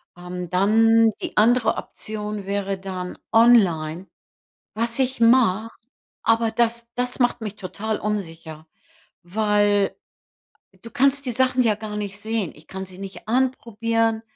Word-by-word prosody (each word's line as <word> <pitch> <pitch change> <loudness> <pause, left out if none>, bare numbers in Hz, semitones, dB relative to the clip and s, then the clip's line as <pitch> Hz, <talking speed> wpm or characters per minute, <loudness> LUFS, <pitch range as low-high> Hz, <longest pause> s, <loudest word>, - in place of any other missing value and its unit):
Ähm, 180 0 -7
dann 225 +5 +4
die - - -5
andere 235 +2 +4
Option 210 -1 -6
wäre 200 0 -2
dann 185 -1 -6
online. 190 -8 +4 0.7
Was 230 +3 -1
ich 260 -1 0
mache, 230 -3 +4 0.5
aber 225 0 +2
das 235 0 0
das 250 +1 -2
macht 245 -1 +1
mich 210 -2 -5
total 215 +3 -4
unsicher, 165 -6 -5 0.6
weil 205 +1 +1 0.9
du 230 - -10
kannst 275 +3 +2
die 250 - -1
Sachen 255 +1 +2
ja 220 -3 +3
gar 210 0 -6
nicht 205 -1 -5
sehen. 220 -4 -2
Ich 155 +2 -18
kann 190 0 -6
sie 185 0 -14
nicht 195 +2 -9
anprobieren, 230 -2 0
215 Hz, 135 wpm, -23 LUFS, 195-230 Hz, 0.9 s, dann